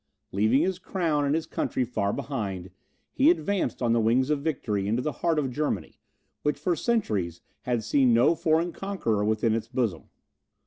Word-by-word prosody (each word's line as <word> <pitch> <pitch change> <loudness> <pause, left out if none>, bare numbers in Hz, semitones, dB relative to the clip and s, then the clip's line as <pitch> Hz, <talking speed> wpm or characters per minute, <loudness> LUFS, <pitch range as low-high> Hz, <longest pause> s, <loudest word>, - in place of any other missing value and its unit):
Leaving 110 +9 +3
his 185 0 -1
crown 165 -6 0
and 140 +2 +2
his 160 - -1
country 130 - -1
far 100 -4 -1
behind, 100 -10 -4 0.4
he 275 +4 +5
advanced 200 - 0
on 115 -1 +3
the 115 - +3
wings 125 +5 +2
of 145 -2 +1
victory 110 -10 -1
into 115 +4 +1
the 150 +4 -1
heart 165 -2 +2
of 135 -4 0
Germany, 120 - -3 0.4
which 150 - 0
for 180 -2 0
centuries 105 - -1 0.3
had 120 -3 0
seen 130 +2 +3
no 120 +7 +5
foreign 165 +1 +1
conqueror 165 - -1
within 110 +1 +1
its 110 0 -2
bosom. 115 -9 -2
130 Hz, 175 wpm, -27 LUFS, 110-160 Hz, 0.4 s, he